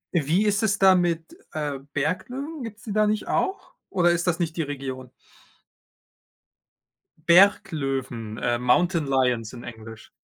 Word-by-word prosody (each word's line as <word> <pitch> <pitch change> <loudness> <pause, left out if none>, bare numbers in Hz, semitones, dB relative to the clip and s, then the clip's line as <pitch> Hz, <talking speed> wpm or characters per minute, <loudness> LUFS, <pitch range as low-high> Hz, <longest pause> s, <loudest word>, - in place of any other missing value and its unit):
Wie 170 +7 +2
ist 210 +1 +2
es 205 -2 +1
da 190 -1 +6
mit, 170 -2 -1 0.2
äh, 145 -3 -3
Berglöwen? 255 - -3
Gibt 220 -2 -7
es - - -19
die 210 - -5
da 215 0 +3
nicht 215 0 -1
auch? 385 +1 -2 0.2
Oder 175 -2 +3
ist 175 +1 -1
das 170 - +2
nicht 170 -2 -2
die 165 - -1
Region? 135 -3 -5 2.2
Berglöwen, 135 - +2
äh, 120 -1 0
Mountain 160 +5 +2
Lions 125 -4 +1
in 120 - -9
Englisch. 110 -1 -10
165 Hz, 145 wpm, -24 LUFS, 130-195 Hz, 2.2 s, da